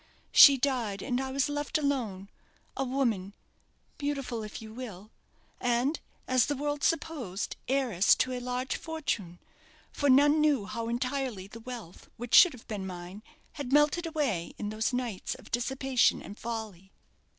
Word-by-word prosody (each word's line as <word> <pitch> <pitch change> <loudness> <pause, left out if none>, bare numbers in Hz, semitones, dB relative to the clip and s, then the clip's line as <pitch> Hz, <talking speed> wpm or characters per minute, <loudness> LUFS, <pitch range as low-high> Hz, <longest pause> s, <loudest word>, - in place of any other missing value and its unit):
She 280 -2 +9
died, 240 -7 -1
and 250 -1 -1
I 265 0 -4
was 275 +1 +1
left 290 +2 -1
alone 245 -10 -2 0.5
a 270 - -1
woman; 235 -7 -1 0.6
beautiful 275 -5 -3
if 215 0 -7
you 220 -1 -10
will, 220 -4 -8 0.5
and, 245 +5 +1 0.3
as 255 -2 +3
the 290 - -1
world 290 +1 -3
supposed, 280 - -1
heiress 245 -8 +3
to 255 - 0
a 250 - -3
large 250 +1 -3
fortune; 230 - -4 0.5
for 285 - 0
none 290 +3 +6
knew 290 -9 +2
how 230 +2 -4
entirely 250 -4 -2
the 215 +3 -11
wealth 230 -7 -9
which 240 +1 -7
should 360 -4 +9
have 250 - -14
been 200 -3 -4
mine 180 +2 -8 0.3
had 280 -4 -6
melted 295 +4 +3
away 275 - -1
in 205 - -4
those 215 +3 -1
nights 245 -6 -3
of - - -15
dissipation 260 +1 +2
and 205 - -10
folly. 215 -5 -6
250 Hz, 155 wpm, -29 LUFS, 215-280 Hz, 0.6 s, She